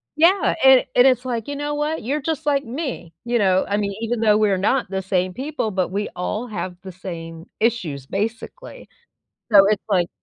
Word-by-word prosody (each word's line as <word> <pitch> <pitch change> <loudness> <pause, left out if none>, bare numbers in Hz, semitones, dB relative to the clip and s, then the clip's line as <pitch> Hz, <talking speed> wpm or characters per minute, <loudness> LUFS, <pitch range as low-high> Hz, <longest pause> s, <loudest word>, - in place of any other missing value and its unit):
Yeah, 345 +6 +3
and 265 -1 +7
and 245 - +6
it's 255 -1 +2
like, 235 -3 -3
"You 285 - -4
know 290 +1 -3
what? 300 +2 -2
You're 285 +6 -1
just 315 +1 -3
like 280 -2 +2
me." 245 - -5
You 240 0 +1
know? 190 -3 +2
I 200 - 0
mean, 200 -1 -1
even 230 +1 -2
though 215 -2 +4
we're 210 -3 +2
not 210 +5 0
the 190 0 -2
same 185 -1 -1
people, 270 0 -3
but 185 -2 -1
we 205 +3 -3
all 210 +6 -3
have 185 -4 -5
the 190 - -9
same 165 -3 -8
issues, 180 - -1
basically. 225 - -5 0.7
So, 200 -2 +8
it's 210 -1 +1
like 180 -4 +2
215 Hz, 200 wpm, -21 LUFS, 190-265 Hz, 0.7 s, So